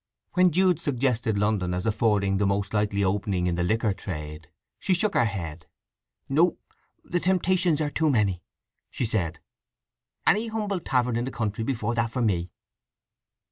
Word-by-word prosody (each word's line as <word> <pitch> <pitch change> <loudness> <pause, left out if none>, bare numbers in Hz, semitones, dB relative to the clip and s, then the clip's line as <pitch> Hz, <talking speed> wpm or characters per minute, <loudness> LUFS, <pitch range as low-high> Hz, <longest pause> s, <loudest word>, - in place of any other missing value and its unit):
When 180 0 +5
Jude 180 0 +3
suggested 125 -7 0
London 100 -4 0
as 90 - -3
affording 105 -3 +2
the 100 0 +2
most 100 +1 -1
likely 105 -1 +1
opening 95 -1 0
in 90 - +1
the 85 - -1
liquor 110 +2 +1
trade, 75 -5 -7 0.3
she 185 - +1
shook 205 +4 +1
her 120 - +3
head. 85 -7 -5 0.6
"No—the 170 +3 -1
temptations 180 -3 +2
are 150 -1 -1
too 160 0 +1
many," 100 -9 +1 0.5
she 125 - -2
said. 95 -8 -1 0.9
"Any 220 +3 +3
humble 210 -4 -2
tavern 125 -6 0
in 120 - -1
the - - -3
country 110 -2 -2
before 120 -2 -1
that 115 -1 0
for 125 +1 -2
me." 90 -5 0
110 Hz, 155 wpm, -26 LUFS, 100-150 Hz, 0.9 s, When